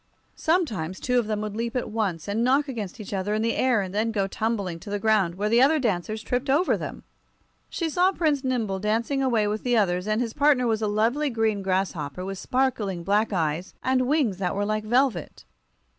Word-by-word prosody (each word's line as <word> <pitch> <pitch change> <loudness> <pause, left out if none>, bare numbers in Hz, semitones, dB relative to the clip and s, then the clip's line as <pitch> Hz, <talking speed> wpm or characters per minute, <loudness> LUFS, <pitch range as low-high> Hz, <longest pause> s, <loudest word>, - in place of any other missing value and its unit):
Sometimes 220 - 0
two 250 -1 +1
of 230 - -2
them 215 -1 -1
would 210 -1 -4
leap 230 +2 -3
at 245 -3 -2
once, 195 -8 -2
and 210 +3 0
knock 275 +4 +3
against 230 -5 -5
each 210 -1 -7
other 200 +2 -1
in 215 - 0
the 230 - 0
air, 250 -5 +2
and 190 -1 -5
then 220 +2 0
go 200 -3 0
tumbling 200 -4 -2
to 205 - -10
the 205 - -1
ground, 205 -5 +2
where 205 +3 -1
the 230 +3 +4
other 295 +4 +5
dancers 215 - -1
tripped 250 +3 -2
over 300 +7 +3
them. - - -6 0.7
She 335 - -2
saw 360 +4 +3
Prince 305 -7 0
Nimble 230 -7 -1
dancing 225 +7 0
away 235 -5 +2
with 210 +1 -2
the 245 -1 +2
others, 180 -2 +1
and 215 +1 +1
his 235 -2 -2
partner 280 -3 +3
was 220 -2 0
a 215 - +1
lovely 230 +8 +1
green 220 -4 0
grasshopper 185 -4 -2
with 195 0 -5
sparkling 220 -9 -1
black 210 +4 +1
eyes 165 -1 -2
and 255 -1 +2
wings 270 - +1
that 185 -1 -2
were 205 +1 0
like 215 0 -1
velvet. 240 - 0
220 Hz, 215 wpm, -25 LUFS, 195-255 Hz, 0.7 s, other